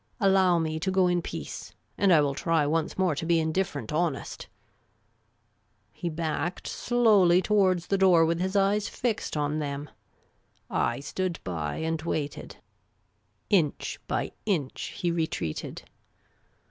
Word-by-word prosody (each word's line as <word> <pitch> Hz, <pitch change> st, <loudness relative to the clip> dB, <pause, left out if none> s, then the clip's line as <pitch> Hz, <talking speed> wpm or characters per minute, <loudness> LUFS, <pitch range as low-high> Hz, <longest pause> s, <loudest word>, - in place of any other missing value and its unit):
Allow 190 Hz, -3 st, +4 dB
me 160 Hz, -1 st, -1 dB
to 190 Hz, -, -1 dB
go 190 Hz, -1 st, +3 dB
in 175 Hz, -1 st, +2 dB
peace, 75 Hz, -, -7 dB, 0.2 s
and 195 Hz, -1 st, +3 dB
I 160 Hz, -3 st, +7 dB
will 140 Hz, -1 st, +1 dB
try 160 Hz, +1 st, +1 dB
once 155 Hz, +2 st, -1 dB
more 185 Hz, -4 st, +2 dB
to 145 Hz, -, -4 dB
be 165 Hz, 0 st, +3 dB
indifferent 160 Hz, +1 st, -2 dB
honest! 155 Hz, -3 st, -2 dB, 0.7 s
" 105 Hz, 0 st, -43 dB
He 175 Hz, -, -4 dB
backed 160 Hz, +1 st, -3 dB
slowly 210 Hz, -8 st, +4 dB
towards 185 Hz, -3 st, +2 dB
the 195 Hz, -, 0 dB
door, 180 Hz, -4 st, +6 dB
with 165 Hz, +1 st, 0 dB
his 190 Hz, +2 st, -2 dB
eyes 200 Hz, +1 st, +2 dB
fixed 230 Hz, -9 st, -2 dB
on 150 Hz, +1 st, 0 dB
them. 145 Hz, -1 st, -4 dB, 0.8 s
I 120 Hz, +3 st, 0 dB
stood 175 Hz, +4 st, -3 dB
by 80 Hz, -5 st, -3 dB
and 160 Hz, -1 st, -2 dB
waited. 150 Hz, -3 st, -4 dB, 0.9 s
Inch 165 Hz, -8 st, +1 dB
by -, -, -1 dB, 0.2 s
inch 155 Hz, -10 st, -2 dB
he 175 Hz, -, 0 dB
retreated. 160 Hz, -, -3 dB
170 Hz, 140 wpm, -27 LUFS, 150-190 Hz, 0.9 s, I